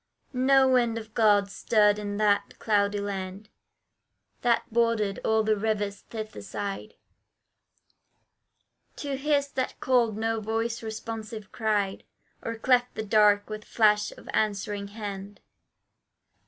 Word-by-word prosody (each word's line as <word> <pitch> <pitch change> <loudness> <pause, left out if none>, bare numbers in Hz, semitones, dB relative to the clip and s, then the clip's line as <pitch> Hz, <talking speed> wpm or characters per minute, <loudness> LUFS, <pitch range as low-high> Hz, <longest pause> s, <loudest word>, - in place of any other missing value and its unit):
No 265 +1 +4
wind 240 -3 +2
of 220 -1 -8
God 205 -3 +4
stirred 210 -1 +3
in 205 -1 -4
that 205 -1 +1
cloudy 205 -1 +1
land 195 0 -5 0.9
That 240 -1 +2
bordered 230 -4 +1
all 220 0 +2
the 215 0 +2
River's 205 -1 -1
thither 215 - -7
side; 200 - -5 2.0
To 280 -2 -4
his 285 0 +1
that 260 -2 -3
called 235 -5 +2
no 225 0 0
voice 225 +2 -2
responsive 220 -1 -6
cried, 210 -4 -1 0.4
Or 230 - -4
cleft 245 +1 +2
the 220 - -4
dark 205 -1 +4
with 215 0 -6
flash 210 -2 +2
of - - -15
answering 205 -1 -1
hand. 200 -1 -7
215 Hz, 120 wpm, -27 LUFS, 205-230 Hz, 2.0 s, No